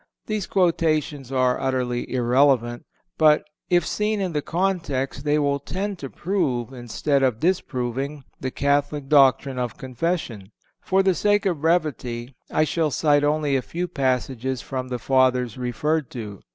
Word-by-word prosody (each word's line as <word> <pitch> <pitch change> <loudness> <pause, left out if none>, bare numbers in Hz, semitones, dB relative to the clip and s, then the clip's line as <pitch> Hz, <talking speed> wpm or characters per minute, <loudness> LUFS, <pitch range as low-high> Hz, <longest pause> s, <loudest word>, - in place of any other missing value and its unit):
These 215 -3 -2
quotations 155 -7 +1
are 130 -1 +2
utterly 125 -2 -1
irrelevant; 125 -1 +2 0.3
but, 155 -1 +5 0.3
if 175 -2 +3
seen 210 0 -1
in 185 -3 -2
the 150 - 0
context, 165 -7 -1
they 150 0 +3
will 140 -1 +1
tend 190 +6 -4
to 135 - -6
prove, 135 - -1
instead 130 +3 -1
of 125 -4 +1
disproving, 140 -4 -1 0.2
the 130 - -2
Catholic 145 +1 0
doctrine 135 -2 +4
of 125 -2 -3
Confession. 130 - -3 0.3
For 190 +1 +2
the 190 -1 +3
sake 205 +3 +2
of 175 -7 0
brevity 140 -7 -1 0.2
I - - +2
shall 155 0 0
cite 145 0 +2
only 150 -1 +1
a 130 - +2
few 175 +7 -4
passages 130 -2 -1
from 130 0 -5
the 125 -1 -3
Fathers 125 -1 +2
referred 130 +4 -1
to. 105 -5 -7
140 Hz, 150 wpm, -23 LUFS, 125-160 Hz, 0.3 s, but